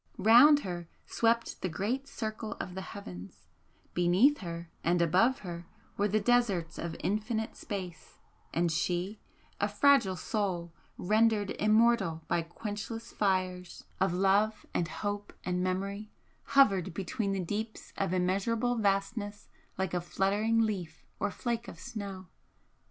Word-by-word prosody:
Round 245 +9 +7
her 175 - -5 0.2
swept 230 0 0
the 185 - -1
great 235 - -2
circle 220 -3 -4
of 180 - -6
the 190 - -5
heavens 95 - -9 0.5
beneath 185 +12 +4
her 170 -2 -6
and 175 +2 +2
above 185 +10 +3
her 170 -3 -7 0.3
were 205 - +1
the 215 +2 +2
deserts 205 -7 +1
of 165 -1 -4
infinite 220 +2 -1
space 180 -6 -7 0.3
and 170 0 +1
she, 180 +5 -1 0.4
a 205 - +2
fragile 210 -2 +4
soul 180 -5 -2 0.2
rendered 215 +1 +2
immortal 215 -6 +3
by 170 - +1
quenchless 210 +6 -6
fires 185 -3 -1 0.2
of 190 -1 +2
love 195 +4 +2
and 170 - 0
hope 205 +2 -4
and 180 0 -1
memory, 200 +3 -2 0.4
hovered 195 -10 +4
between 195 +2 -2
the 195 - -1
deeps 215 +4 -5
of 195 -3 -1
immeasurable 200 +7 +1
vastness 205 0 -1 0.3
like 190 -2 -1
a 180 - 0
fluttering 205 +6 +1
leaf 185 -7 -3
or 205 - 0
flake 235 +3 -3
of - - -9
snow! 200 -5 -6
200 Hz, 135 wpm, -31 LUFS, 180-220 Hz, 0.5 s, Round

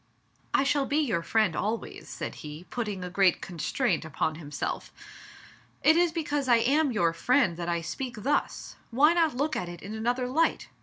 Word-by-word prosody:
"I - - +3
shall 275 0 +1
be 285 - 0
your 230 - +1
friend 215 -2 +1
always," 220 +2 -3
said - - -5
he, 150 +2 -8
putting 210 -6 -3
a 180 - -4
great 190 -1 +3
constraint 175 - -1
upon 155 0 -1
himself. 150 -2 -5 0.9
"It 315 - +6
is 345 0 +3
because 295 -4 -2
I 240 - +6
am 275 +5 +2
your 170 -7 +2
friend 245 -1 +2
that 175 0 -3
I 170 -1 0
speak 240 +5 -5
thus; 290 +3 -1
why 290 +7 +5
not 325 -6 +2
look 300 +3 0
at 180 - -3
it 175 -1 -9
in 200 +3 -6
another 245 +3 -1
light? 320 +6 +1
230 Hz, 185 wpm, -28 LUFS, 175-280 Hz, 0.9 s, It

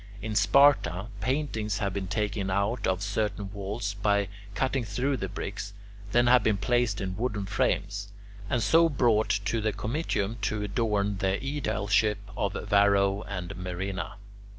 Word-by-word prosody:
In 110 +1 -4
Sparta, 105 - +4
paintings 115 -5 -1
have 100 -2 -1
been 95 -1 -3
taken 105 -1 -1
out 100 +5 0
of 95 +1 0
certain 100 -1 -2
walls 100 +1 -3
by 100 -1 +1 0.3
cutting 130 +2 0
through 130 +5 -1
the 95 - -4
bricks, 100 +1 -5 0.4
then 120 +2 +4
have 125 0 +6
been 105 -1 +2
placed 120 0 +1
in 95 -1 -3
wooden 105 -2 -2
frames, 100 0 -1 0.4
and 120 -3 +1
so 165 +12 +5
brought 120 -6 +2 0.2
to 115 +2 0
the 110 0 +1
Comitium 110 0 -2
to 105 +1 -1
adorn 105 -1 0
the 95 0 +1
aedileship 110 -6 0 0.2
of - - -1
Varro 100 0 +3
and 95 -1 -5
Murena. 90 +1 -4
105 Hz, 150 wpm, -28 LUFS, 100-115 Hz, 0.4 s, have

